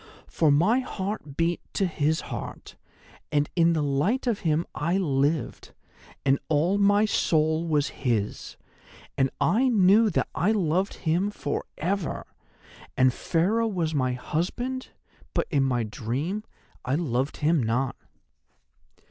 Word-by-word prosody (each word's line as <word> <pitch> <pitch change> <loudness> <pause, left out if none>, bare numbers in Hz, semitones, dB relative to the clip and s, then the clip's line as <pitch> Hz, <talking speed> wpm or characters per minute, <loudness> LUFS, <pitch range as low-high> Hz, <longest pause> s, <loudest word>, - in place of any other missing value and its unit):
For 160 - +1
my 180 - +4
heart 195 - -5
beat 170 +1 +1
to 195 - +1
his 160 -2 0
heart, - - -7 0.6
and 145 -1 +2
in 170 -1 +4
the 155 -2 0
light 145 - 0
of 235 -5 0
him 160 0 +1
I 170 +5 0
lived, 150 -3 -1 0.5
and 135 0 +3
all 165 +6 +2
my 205 +1 +4
soul 160 -4 +1
was 150 -2 +1
his, 115 -6 -2 0.6
and 135 -1 +2
I 215 - +3
knew 210 0 +5
that 175 - 0
I 205 +6 +2
loved 185 -1 0
him 175 +5 +2
for 145 -8 -4
ever. 185 +1 -2 0.7
And 130 -1 +4
Pharaoh 205 +11 +1
was 170 -7 -1
my 130 -3 +1
husband; 240 - -3 0.5
but, - - +1
in 140 -4 +3
my 125 -3 +1
dream, 135 - -3 0.4
I 130 +2 0
loved 140 -4 -1
him 155 0 +2
not. 120 +3 0
160 Hz, 135 wpm, -26 LUFS, 140-195 Hz, 0.7 s, knew